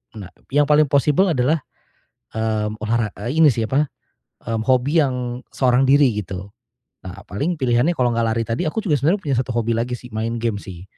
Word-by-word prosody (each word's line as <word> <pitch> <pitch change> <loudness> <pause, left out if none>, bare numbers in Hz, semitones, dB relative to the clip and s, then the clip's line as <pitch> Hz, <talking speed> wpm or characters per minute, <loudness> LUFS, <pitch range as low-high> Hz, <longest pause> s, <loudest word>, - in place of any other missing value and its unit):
Nga 105 -3 -8
nah - - -29 0.2
yang 145 +1 +4
paling 150 +1 +5
possible 150 +7 +3
adalah, 140 +3 +1 0.7
mmm, 110 -1 -2
olahra 110 0 0 0.2
e 120 - -1
ini 160 -2 +7
sih 115 -1 -2
apa, 145 +3 +2 0.6
mmm, 115 -1 -2
hobi 135 +5 +3
yang 125 -3 -3
seorang 125 -1 +3
diri 140 -3 +5
gitu. 95 0 -7 0.6
Nah 95 +2 -9
paling 145 - -2
pilihannya 125 +5 +2
kalau 125 -2 +2
enggak 115 0 +1
lari 115 +1 0
tadi 115 +2 -2
aku 220 - -2
juga 155 -8 +2
sebenarnya 170 +8 +2
punya 140 -4 -1
satu 125 0 -2
hobi 115 0 0
lagi 120 +2 -2
sih, 125 - -13
main 115 +2 -2
game 115 -3 -1
sih. 90 -2 -10
125 Hz, 195 wpm, -21 LUFS, 110-145 Hz, 0.7 s, ini